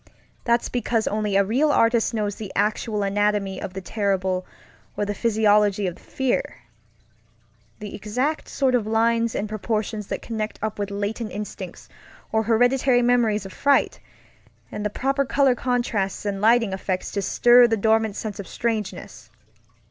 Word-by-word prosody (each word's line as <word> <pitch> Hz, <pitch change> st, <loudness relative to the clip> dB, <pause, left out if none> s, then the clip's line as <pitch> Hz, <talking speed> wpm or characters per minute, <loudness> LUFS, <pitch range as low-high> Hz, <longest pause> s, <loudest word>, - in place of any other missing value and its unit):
That's 235 Hz, 0 st, +2 dB
because 235 Hz, -2 st, -1 dB
only 210 Hz, -1 st, -1 dB
a 200 Hz, -, +5 dB
real 260 Hz, +10 st, +2 dB
artist 230 Hz, -3 st, +3 dB
knows 210 Hz, -3 st, -1 dB
the 200 Hz, -1 st, -8 dB
actual 210 Hz, +1 st, 0 dB
anatomy 200 Hz, -1 st, 0 dB
of 190 Hz, -, -6 dB
the 190 Hz, -, -4 dB
terrible 190 Hz, -2 st, -1 dB, 0.5 s
or 205 Hz, -, 0 dB
the 205 Hz, -, -2 dB
physiology 210 Hz, -2 st, +2 dB
of 180 Hz, -2 st, -3 dB
fearŌĆöthe 265 Hz, -2 st, -2 dB, 1.3 s
exact 215 Hz, +9 st, -3 dB
sort 265 Hz, -2 st, +1 dB
of 235 Hz, -4 st, +1 dB
lines 230 Hz, +1 st, +1 dB
and 205 Hz, -, -2 dB
proportions 215 Hz, -1 st, -3 dB
that -, -, -4 dB
connect 220 Hz, -2 st, -4 dB
up 215 Hz, -1 st, -3 dB
with 205 Hz, 0 st, -2 dB
latent 205 Hz, +3 st, -3 dB
instincts 210 Hz, 0 st, -7 dB, 0.4 s
or 220 Hz, -, +2 dB
hereditary 245 Hz, +3 st, +3 dB
memories 235 Hz, -4 st, +2 dB
of 195 Hz, -, -9 dB
fright, 280 Hz, -1 st, +2 dB, 0.7 s
and 210 Hz, -, -5 dB
the 210 Hz, -, 0 dB
proper 275 Hz, +6 st, 0 dB
color 275 Hz, 0 st, +3 dB
contrasts 240 Hz, -6 st, -1 dB
and 200 Hz, -1 st, -2 dB
lighting 225 Hz, -2 st, +3 dB
effects 190 Hz, -1 st, -3 dB
to 200 Hz, -, -2 dB
stir 240 Hz, +5 st, +5 dB
the 225 Hz, -1 st, 0 dB
dormant 220 Hz, 0 st, +2 dB
sense 215 Hz, -3 st, -5 dB
of 200 Hz, -, -6 dB
strangeness. 210 Hz, -, -4 dB
215 Hz, 150 wpm, -23 LUFS, 205-235 Hz, 1.3 s, a